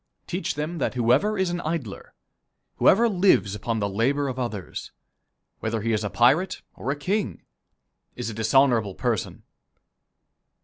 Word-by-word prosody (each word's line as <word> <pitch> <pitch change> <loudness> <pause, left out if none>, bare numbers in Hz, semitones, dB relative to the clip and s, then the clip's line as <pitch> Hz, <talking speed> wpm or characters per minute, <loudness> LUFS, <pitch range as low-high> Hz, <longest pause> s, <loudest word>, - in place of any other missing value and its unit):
Teach 180 +3 -3
them 155 +3 -3
that 130 - -1
whoever 125 - +2
is 190 -2 +1
an 175 0 -3
idler, 155 - -5 0.6
whoever 230 +5 +5
lives 180 - +3
upon 115 +2 -2
the 100 -2 0
labor 135 +8 0
of 130 0 -5
others, 110 -7 -5 0.7
whether 110 -1 -2
he 115 0 +1
is 110 0 0
a 105 - -2
pirate 140 - +2
or 130 - -6
a 140 - +1
king, 190 +9 -2 0.7
is - - -4
a 115 - -4
dishonorable 110 -2 +2
person. - - -2
130 Hz, 145 wpm, -25 LUFS, 110-170 Hz, 0.7 s, whoever